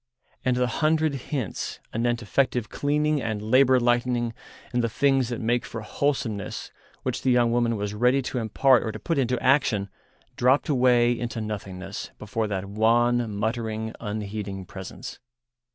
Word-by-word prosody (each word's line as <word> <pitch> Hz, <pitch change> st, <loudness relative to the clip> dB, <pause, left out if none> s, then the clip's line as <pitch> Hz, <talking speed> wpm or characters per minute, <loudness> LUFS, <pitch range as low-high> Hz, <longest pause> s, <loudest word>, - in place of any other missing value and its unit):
And 125 Hz, -1 st, +1 dB
the 125 Hz, -, +2 dB
hundred 155 Hz, +4 st, +1 dB
hints 135 Hz, -4 st, -4 dB
anent 120 Hz, +1 st, 0 dB
effective 125 Hz, 0 st, 0 dB
cleaning 150 Hz, 0 st, +1 dB
and 110 Hz, -3 st, -2 dB
labour 130 Hz, +4 st, +4 dB
lightening 120 Hz, -1 st, +1 dB, 0.4 s
and 120 Hz, 0 st, +1 dB
the 115 Hz, -, +1 dB
things 135 Hz, +1 st, +2 dB
that 120 Hz, -, -3 dB
make 120 Hz, +2 st, +1 dB
for 115 Hz, -2 st, -6 dB
wholesomeness 115 Hz, -3 st, -2 dB, 0.3 s
which -, -, -2 dB
the -, -, +1 dB
young 120 Hz, -2 st, +4 dB
woman 120 Hz, -1 st, +2 dB
was 105 Hz, 0 st, -3 dB
ready 125 Hz, +5 st, +2 dB
to 125 Hz, 0 st, -2 dB
impart 120 Hz, +3 st, +4 dB
or 110 Hz, -, -3 dB
to -, -, -7 dB
put 165 Hz, -4 st, -1 dB
into 125 Hz, -2 st, +1 dB
action 125 Hz, -7 st, +2 dB, 0.5 s
dropped 130 Hz, +5 st, +3 dB
away 125 Hz, -3 st, +4 dB
into 120 Hz, -1 st, -3 dB
nothingness 100 Hz, -3 st, -5 dB
before 110 Hz, +1 st, -2 dB
that 100 Hz, -2 st, -3 dB
wan, 115 Hz, +3 st, +2 dB
muttering, 110 Hz, 0 st, -2 dB
unheeding 105 Hz, -3 st, -4 dB
presence. 95 Hz, +1 st, -8 dB
120 Hz, 150 wpm, -25 LUFS, 110-130 Hz, 0.5 s, labour